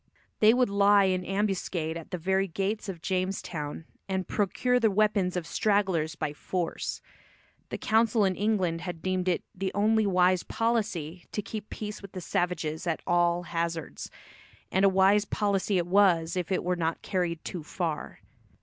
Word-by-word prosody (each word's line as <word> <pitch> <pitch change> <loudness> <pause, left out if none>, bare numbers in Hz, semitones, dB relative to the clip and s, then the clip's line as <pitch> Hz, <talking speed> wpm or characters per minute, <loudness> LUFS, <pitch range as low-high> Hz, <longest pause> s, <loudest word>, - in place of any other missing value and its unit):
They 215 0 +7
would 245 -2 +2
lie 200 0 +5
in 185 -1 +1
ambuscade 190 -5 -1
at 165 -1 -8
the 185 - -3
very 190 +3 +1
gates 200 +4 -2
of 170 -4 -7
Jamestown 180 -5 -3 0.2
and 190 -2 -1
procure 250 +5 +1
the 225 -2 +4
weapons 200 -3 +2
of 175 - -3
stragglers 185 -4 +1
by 150 - -3
force. 175 +3 -3 0.7
The - - -4
council 220 -1 +3
in 190 -1 +1
England 190 -5 0
had 175 -3 -6
deemed 185 -1 -1
it 180 - +1
the 190 0 -3
only 215 +1 +3
wise 185 -1 +3
policy 200 -8 -2
to 210 - -3
keep 215 0 -6
peace 210 -1 -6
with 195 -2 -11
the 185 - -5
savages 175 -2 -2
at 165 - -1
all 175 0 +2
hazards, 170 -2 -3 0.6
and 190 - +2
a 195 - +7
wise 195 +2 +4
policy 200 -1 0
it 175 - +1
was 175 -3 +3
if 180 0 -2
it 185 - +1
were 180 0 0
not 165 -1 -2
carried 175 -3 -2
too 175 - -4
far. 160 0 -4
185 Hz, 170 wpm, -28 LUFS, 170-205 Hz, 0.7 s, They